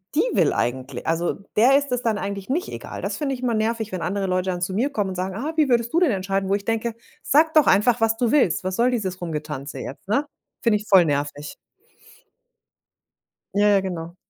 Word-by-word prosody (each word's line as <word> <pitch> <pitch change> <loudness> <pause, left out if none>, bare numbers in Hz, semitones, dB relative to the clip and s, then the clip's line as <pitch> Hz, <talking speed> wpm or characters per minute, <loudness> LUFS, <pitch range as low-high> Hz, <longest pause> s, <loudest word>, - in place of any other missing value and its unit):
die - - +4
will - - +3
eigentli 130 +1 -2
also, 165 +1 0 0.2
der 255 +5 +6
ist 285 -2 -2
es 250 0 0
dann 220 -3 +1
eigentlich 200 +2 -5
nicht 345 +8 -1
egal. - - -7
Das - - -3
finde 285 -3 -2
ich 250 - -10
immer 245 -2 0
nervig, 220 0 -1
wenn 185 -2 -4
andere 195 +3 -2
Leute 185 0 0
dann 175 - -4
zu 185 +1 -2
mir 250 +8 +1
kommen 205 -6 -1
und 185 - -5
sagen: 185 +1 -3
„Ah, 295 +9 -3
wie 305 -3 +3
würdest 235 -2 +1
du 340 - +4
denn 350 -7 +3
entscheiden?“ 195 -1 -1
Wo 200 - +3
ich 200 - -5
denke: 225 0 -1 0.3
„Sag 315 +3 +3
doch 310 -3 +5
einfach, 230 +3 +4
was 225 0 +3
du 240 0 +1
willst. 195 - +2
Was 185 0 -2
soll 240 +3 +2
dieses 190 -6 -2
Rumgetanze 150 -4 -5
jetzt“, 155 +11 -8
ne? 260 +8 +1 0.4
Finde 220 -3 +3
ich 210 - -9
voll 185 -4 +6
nervig. 145 0 -3 2.0
Ja, 205 +1 +3
ja, 200 -1 +5
genau. 175 -2 -5
205 Hz, 220 wpm, -23 LUFS, 180-240 Hz, 2.0 s, der